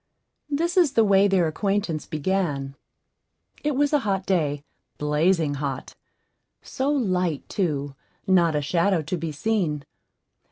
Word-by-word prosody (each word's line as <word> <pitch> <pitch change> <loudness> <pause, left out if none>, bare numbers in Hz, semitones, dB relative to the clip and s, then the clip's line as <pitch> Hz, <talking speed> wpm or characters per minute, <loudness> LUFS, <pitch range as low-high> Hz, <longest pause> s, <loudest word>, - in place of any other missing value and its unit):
This 335 +5 -1
is 335 -7 +4
the 225 - +4
way 200 -1 +5
their 190 -3 +3
acquaintance 195 -1 -1
began: 150 -4 -1 0.9
It 295 -2 0
was 290 +2 +1
a 295 - +5
hot 195 -6 -1
day 150 -6 0 0.3
blazing 150 +1 +1
hot; 140 -2 -4 0.7
so 265 +2 -2
light 185 - 0
too 145 -8 -2 0.3
not 170 -4 +3
a 150 - 0
shadow 170 +3 +1
to 165 +5 -3
be 165 -2 -4
seen. 155 -4 -1
180 Hz, 130 wpm, -24 LUFS, 150-205 Hz, 0.9 s, way